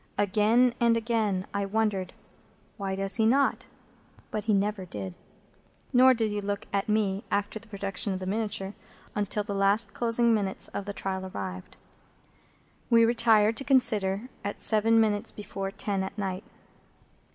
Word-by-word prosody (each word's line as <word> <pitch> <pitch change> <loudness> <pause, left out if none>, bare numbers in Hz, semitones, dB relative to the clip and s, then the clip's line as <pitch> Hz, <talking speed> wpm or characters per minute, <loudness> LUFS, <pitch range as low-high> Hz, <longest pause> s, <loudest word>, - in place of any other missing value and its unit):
Again 215 +5 +3
and 235 -1 +3
again 220 -5 0
I 200 0 -1
wondered, 200 -3 -1 0.6
"Why 195 -2 -3
does 195 +2 +3
he 220 - +3
not?" 275 +4 +2 0.6
But 215 - -3
he 220 - +1
never 200 0 -1
did. 100 - -6 0.8
Nor 255 +1 +6
did 225 -2 -1
he 205 0 -2
look 200 0 -3
at 200 +2 -1
me, 205 -2 0
after 205 +2 -1
the 230 - -15
production 200 0 -1
of 190 - -3
the 185 - -6
miniature, 205 -1 -2 0.4
until 205 0 -1
the 205 0 -5
last 195 +2 +2
closing 235 0 +2
minutes 200 -3 -1
of 200 - -5
the 205 - -5
trial 190 -1 -4
arrived. 95 - -7 1.1
We 230 -1 +6
retired 225 -2 +3
to - - -1
consider, 215 -6 +2 0.2
at 205 - -4
seven 225 +1 +4
minutes 210 -2 +1
before 195 -2 -5
ten 200 -1 -2
at 190 +2 -5
night. 190 -1 -4
205 Hz, 155 wpm, -27 LUFS, 195-225 Hz, 1.1 s, Nor